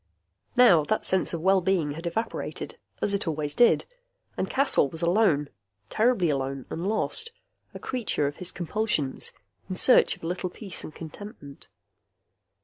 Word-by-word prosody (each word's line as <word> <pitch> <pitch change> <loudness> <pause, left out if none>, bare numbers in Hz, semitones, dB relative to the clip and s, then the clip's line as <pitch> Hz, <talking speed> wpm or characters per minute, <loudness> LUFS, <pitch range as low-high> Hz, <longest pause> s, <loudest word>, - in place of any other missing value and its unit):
Now 220 -11 +6
that 215 - 0
sense 190 -1 +2
of 170 - -4
well 190 0 +4
being 175 -5 +1
evaporated, 170 +8 -4 0.2
as 200 - +3
it 200 - -1
always 150 -2 -2
did, 240 - +4 0.5
and - - -2
Caswell 265 - +3
was 160 +4 -6
alone, 170 -5 +3 0.4
terribly 215 -8 +2
alone 135 -1 -3
and 170 +4 -3
lost, 450 - 0 0.4
a - - -4
creature 235 - -1
of 145 +1 -3
his 180 - -2
compulsions, 175 -6 -2 0.4
in 185 - -3
search 250 - +5
of - - -22
a - - -3
little 180 +1 -3
peace 195 0 -6
and 155 - -9
contentment. 160 - -10
180 Hz, 150 wpm, -26 LUFS, 155-215 Hz, 0.5 s, Now